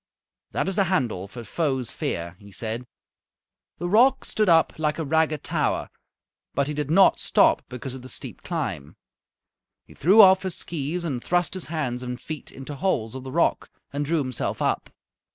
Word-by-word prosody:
"That - - -1
is 195 - -1
the 195 -1 +3
handle 120 - 0
for 120 +4 -9
'Foes' 130 0 -1
fear,'" 85 +1 -3
he 100 -1 -14
said. 115 +5 -4 0.9
The 175 - -3
rock 250 +8 +4
stood 215 -3 +1
up 165 -1 +4
like 150 -1 0
a 160 - -2
ragged 155 0 +1
tower, - - -1 0.6
but 140 0 +1
he 150 - -2
did 150 -1 -3
not 190 +4 +5
stop - - +4
because 125 +1 -6
of 130 - -8
the 130 - -10
steep - - -7
climb. 110 - -4 0.9
He - - -16
threw 190 +9 +4
off 190 -2 +9
his 190 -2 -2
skees 165 +2 -3
and 130 -7 -3
thrust 175 0 +1
his 185 -2 -3
hands 140 -7 -3
and 125 0 -5
feet 155 -2 -7
into 135 +2 -8
holes 130 - 0
of 130 - -6
the 130 - -7
rock 170 +4 +1 0.2
and 145 +1 -1
drew 165 +3 0
himself 130 -5 -2
up. - - 0
150 Hz, 185 wpm, -25 LUFS, 125-175 Hz, 0.9 s, off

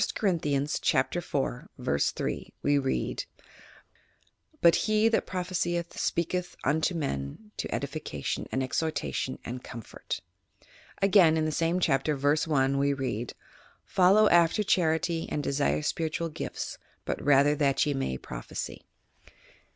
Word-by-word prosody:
Corinthians, 150 -7 0
Chap. - - +2
14, - - -2
v, 70 - 0 0.2
3, - - -3
we 145 0 +3
read: 135 -1 -1 1.3
"But 170 - +6
he 215 +1 +4
that 225 - +1
prophesieth 175 -2 -2
speaketh 175 +1 -1
unto 155 +5 +1
men 140 - -4
to - - -4
edification, 140 - -3
and 130 - 0
exhortation 130 - -2
and 125 +1 -6
comfort. 115 -3 -6 0.3
' - - -30
' - - -24
Again, 185 -5 +6
in 155 - +1
the 155 - 0
same 165 +3 +1
Chapter, 150 -2 +2
v. 140 +1 +1 0.2
1, 140 -2 +2
we 140 0 +2
read: 120 -4 -3 0.5
"Follow 195 +3 +5
after 170 +5 +4
charity 165 -2 +1
and 150 - -2
desire 140 +2 +1
spiritual 165 +2 -1
gifts, 155 - -5 0.3
but - - -3
rather 145 +1 +5
that 140 -2 +2
ye 145 - 0
may 100 - -2
proph - - -9
esy." - - -5
155 Hz, 135 wpm, -28 LUFS, 135-170 Hz, 1.3 s, But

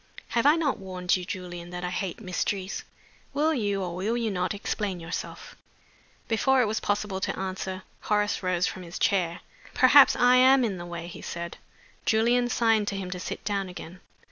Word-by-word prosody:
"Have 235 +3 +2
I 300 - +7
not 315 -5 0
warned 185 -1 -1
you, 185 - -3
Julian, 175 -3 -6
that 180 0 -6
I 180 - -2
hate 180 -1 -3
mysteries? 190 -1 -3 0.5
Will 310 +3 +2
you, 205 -7 -1
or 175 -2 -4
will 210 +6 -1
you 230 -3 -1
not, 180 -2 -1
explain 200 -2 -3
yourself?" 165 +1 -6 0.7
Before 265 +4 +3
it 250 - +4
was 215 +1 -1
possible 205 -1 -1
to - - -2
answer, 190 0 -4 0.2
Horace 210 -1 0
rose 185 -1 +1
from 185 - -4
his 175 -1 -8
chair. 175 -4 +1 0.3
"Perhaps 265 +2 +7
I 250 +1 +5
am 260 +1 +6
in 200 -5 -2
the 175 0 -7
way?" 170 -1 -6
he 170 - -9
said. 170 0 -6 0.5
Julian 240 +2 +3
signed 225 -3 +2
to 200 - -2
him 185 -2 -5
to 180 - -4
sit - - -6
down 200 -2 -1
again. 180 0 -9
195 Hz, 190 wpm, -27 LUFS, 180-225 Hz, 0.7 s, I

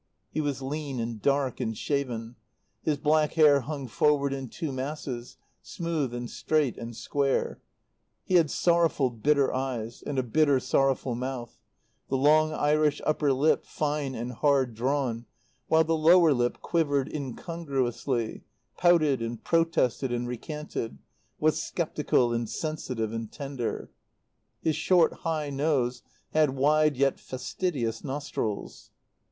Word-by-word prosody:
He 155 - -1
was 140 -3 -2
lean 140 -1 -4
and 115 -2 -4
dark 140 -1 +1
and 110 -1 -2
shaven; 125 -5 -2 0.5
his 150 -2 0
black 150 +1 +2
hair 150 -3 +6
hung 140 0 -5
forward 140 +3 +2
in 135 -2 -5
two 160 +1 -4
masses, 130 -2 -5 0.2
smooth 145 +3 -2
and 120 0 -4
straight 150 0 0
and 115 0 -7
square; 140 +3 -1 0.6
he - - -4
had 170 -4 +5
sorrowful, 165 -7 +2
bitter 140 +4 +2
eyes, 125 -3 -3
and 145 - -4
a 130 - +2
bitter, 140 +3 +3
sorrowful 135 -1 +1
mouth, 125 -1 -5 0.5
the 135 - +1
long 155 +3 +4
Irish 150 0 +2
upper 150 -2 +2
lip 140 +4 +2
fine 145 -3 -2
and 120 +2 -4
hard 135 -1 +2
drawn, 120 -1 -1 0.4
while 160 0 +5
the 165 +1 +1
lower 165 0 +6
lip 120 -1 -1
quivered 145 -5 +1
incongruously, 135 -4 -2 0.4
pouted 155 -7 +4
and 115 0 -4
protested 165 -6 +1
and 120 0 -2
recanted, 125 - -5 0.4
was - - +2
sceptical 120 -1 0
and 115 -1 -2
sensitive 130 -8 -3
and 115 -1 -5
tender. 135 -5 -4 0.7
His 155 - +1
short, 175 -3 +3
high 155 -3 -2
nose 135 -4 0 0.3
had 155 -4 +3
wide 150 +1 +3
yet 135 0 +2
fastidious 130 -3 -3
nostrils. 135 -7 -4
140 Hz, 135 wpm, -27 LUFS, 120-155 Hz, 0.7 s, hair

